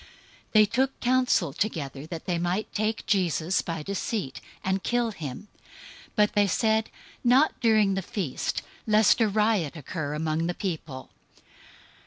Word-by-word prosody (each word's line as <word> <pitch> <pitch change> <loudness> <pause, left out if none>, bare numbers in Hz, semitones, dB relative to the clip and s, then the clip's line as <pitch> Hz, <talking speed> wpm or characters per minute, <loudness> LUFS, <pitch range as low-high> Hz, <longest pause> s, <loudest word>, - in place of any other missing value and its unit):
026:004 - - -19 0.5
They 215 -1 +7
took 260 +6 0
counsel 250 - +2
together 150 - -3
that 165 -1 -7
they 175 -2 -1
might 180 +5 -2
take 220 +1 -1
Jesus 180 -3 +1
by 165 -2 -4
deceit, 195 - -3 0.2
and 190 +1 0
kill 240 +1 0
him. 155 0 -7 0.6
026:005 - - -29
But 210 -1 +3
they 205 -1 +3
said, 220 +3 +1 0.3
"Not 260 +5 +5
during 215 -4 +4
the 195 - -1
feast, 180 -7 -3 0.2
lest 215 +2 +4
a 225 - +5
riot 210 -7 +1
occur 150 0 -4
among 160 +1 -1
the 175 - -2
people." 160 -8 -5
195 Hz, 150 wpm, -27 LUFS, 160-220 Hz, 0.6 s, They